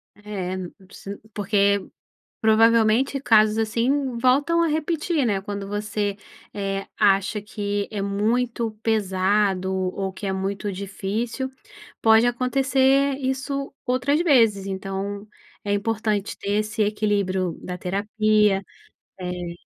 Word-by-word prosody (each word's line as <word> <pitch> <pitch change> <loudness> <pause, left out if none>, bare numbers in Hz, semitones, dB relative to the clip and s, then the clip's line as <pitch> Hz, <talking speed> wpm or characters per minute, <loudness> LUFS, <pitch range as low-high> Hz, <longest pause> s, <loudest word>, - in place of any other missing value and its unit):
É, 200 -3 -5
n 185 -2 -6
não 190 - -19
preci 200 +1 -9 0.2
porque, 200 -1 +1 0.5
provavelmente, 225 +4 +4
casos 215 -3 +4
assim 240 +4 0
voltam 280 +7 +3
a - - +3
repetir, 315 -1 0
né, 200 -4 +1
quando 200 0 -5
você, 205 0 -2 0.4
eh, 195 -1 -3
acha 200 0 +3
que 205 -1 -3
é 210 - -4
muito 225 +3 0
pesado, 195 -2 +1
ou 190 +1 -2
que 200 - -7
é 190 - 0
muito 195 +2 -3
difícil, 210 +7 -3 0.5
pode 225 +1 +6
acontecer 265 +2 +2
isso 275 +1 -3
outras 255 +4 +1
vezes, 225 - +4
então 195 +2 -4 0.4
é 205 - -1
importante 210 0 -1
ter 200 - -4
esse 215 +1 -2
equilíbrio 200 -4 0
da 180 0 -5
terapia, 210 +1 +1 0.6
eh 180 -1 -5
210 Hz, 120 wpm, -23 LUFS, 195-240 Hz, 0.6 s, pode